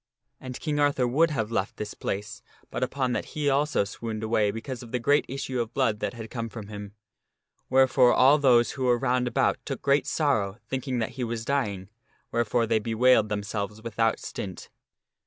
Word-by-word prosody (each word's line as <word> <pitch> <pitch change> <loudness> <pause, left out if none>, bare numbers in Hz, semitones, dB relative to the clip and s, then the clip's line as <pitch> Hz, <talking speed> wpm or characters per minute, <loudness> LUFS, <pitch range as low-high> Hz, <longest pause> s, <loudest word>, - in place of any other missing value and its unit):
And 130 -1 -7
King 150 -2 -1
Arthur 145 -3 +2
would 155 +7 +3
have 115 -7 -2
left 100 -3 -2
this 105 -1 -5
place 105 +2 -4 0.3
but - - -4
upon 130 -2 0
that - - -1
he 150 -1 0
also 145 -3 +2
swooned 110 +2 -5
away 110 -1 +2
because 120 +5 -5
of 120 -2 -11
the 125 - 0
great 145 +5 +2
issue 130 -2 -2
of 115 0 -6
blood 115 -6 +1
that - - -3
had 110 -2 -8
come 115 -2 -4
from 105 -2 -9
him, 105 -1 -8 0.7
where 130 0 +5
fore 125 -1 +5
all 140 +4 +5
those 120 -4 +4
who 130 -2 -3
were 120 -1 +4
round 125 0 +1
about - - +1
took - - -5
great 140 +1 +2
sorrow, 110 -10 0
thinking 130 -1 -2
that 110 -2 -1
he - - 0
was 115 -1 -3
dying, 105 -10 -1 0.4
wherefore 115 0 +1
they 110 0 +2
bewailed 115 0 +3
themselves 105 0 -3
without 115 0 0
stint. 95 -3 -7
120 Hz, 195 wpm, -27 LUFS, 110-130 Hz, 0.7 s, where